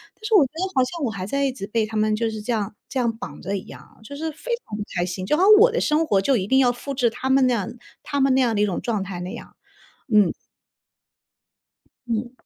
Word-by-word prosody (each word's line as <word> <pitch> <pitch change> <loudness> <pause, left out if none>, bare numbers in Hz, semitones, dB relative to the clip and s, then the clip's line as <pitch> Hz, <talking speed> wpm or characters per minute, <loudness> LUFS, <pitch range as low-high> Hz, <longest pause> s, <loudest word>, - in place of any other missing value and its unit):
但 - - -29
是 445 - -1
我 350 - +7
觉 255 - -9
得 340 - -2
好 260 - +4
像 330 +5 -4
我 225 - -1
还 185 -2 -5
在 280 +5 0
一 270 - +1
直 200 -6 -7
被 220 0 0
他 220 - -8
们 215 0 +2
就 225 +1 0
是 215 -1 -6
这 215 - -3
样 210 -3 -2
这 265 - -2
样 235 -2 0
绑 250 - -8
着 200 - -3
一 195 - -5
样， - - -14
就 285 +6 -9
是 320 +2 -3
非 320 +11 -8
常 210 - -6
不 210 - -3
开 175 - +1
心， 185 +1 -5
就 300 +10 +1
好 365 - +3
像 405 - +7
我 470 +3 +6
的 480 - 0
生 310 +1 +2
活 200 - +3
就 260 +7 +2
一 190 0 -2
定 265 - +3
要 250 -2 +4
复 260 +3 -6
制 245 -3 +2
他 260 - -4
们 265 0 +4
那 250 - +3
样 205 -5 -2 0.3
他 285 -2 -2
们 270 -1 +4
那 265 - +3
样 235 -3 +1
的 205 - +1
一 - - +4
种 195 -4 -2
状 215 -5 -1
态 185 -2 -6
那 180 +1 -5
样， - - -10 0.6
嗯。 205 -4 +5 1.8
嗯。 235 +1 -2
235 Hz, 300 characters per minute, -23 LUFS, 210-275 Hz, 1.8 s, 我